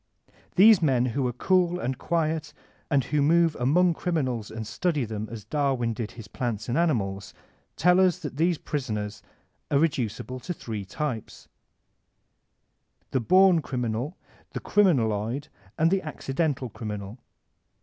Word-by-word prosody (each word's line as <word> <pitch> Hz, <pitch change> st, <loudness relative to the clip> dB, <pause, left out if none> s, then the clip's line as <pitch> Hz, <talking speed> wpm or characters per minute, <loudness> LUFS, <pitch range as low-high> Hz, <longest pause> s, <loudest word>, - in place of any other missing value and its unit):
These 205 Hz, 0 st, +7 dB
men 130 Hz, -6 st, +3 dB
who 135 Hz, 0 st, 0 dB
are -, -, -1 dB
cool 180 Hz, +5 st, +2 dB
and 130 Hz, -5 st, -2 dB
quiet 155 Hz, 0 st, -1 dB, 0.4 s
and 140 Hz, -4 st, +3 dB
who 150 Hz, +4 st, 0 dB
move 165 Hz, +2 st, +4 dB
among 170 Hz, +8 st, +3 dB
criminals 130 Hz, -, -2 dB
and 110 Hz, 0 st, -6 dB
study 150 Hz, -, -1 dB
them 110 Hz, -1 st, -5 dB
as 115 Hz, -3 st, -7 dB
Dar 140 Hz, +2 st, +1 dB
win 120 Hz, -2 st, -1 dB
did 110 Hz, -1 st, -5 dB
his 115 Hz, -3 st, -10 dB
plants 110 Hz, -1 st, -3 dB
and 120 Hz, -, -1 dB
animals, 105 Hz, -, 0 dB, 0.4 s
tell 180 Hz, +1 st, +4 dB
us 185 Hz, -2 st, +4 dB
that 150 Hz, -6 st, -7 dB
these 170 Hz, +1 st, +2 dB
prisoners 110 Hz, -10 st, -4 dB, 0.5 s
are 140 Hz, -, +3 dB
reducible 130 Hz, -4 st, -1 dB
to 180 Hz, +7 st, -5 dB
three 110 Hz, -7 st, -6 dB
types: 125 Hz, +1 st, -5 dB, 1.6 s
The 130 Hz, -, +1 dB
Bom 185 Hz, -, +5 dB
Criminal, 125 Hz, +3 st, -3 dB, 0.4 s
the -, -, -3 dB
Criminaloid, 130 Hz, -, +1 dB, 0.3 s
and 165 Hz, +2 st, +3 dB
the 195 Hz, 0 st, +2 dB
Accidental 145 Hz, -3 st, -2 dB
Criminal. 105 Hz, +1 st, -6 dB
135 Hz, 140 wpm, -26 LUFS, 115-165 Hz, 1.6 s, These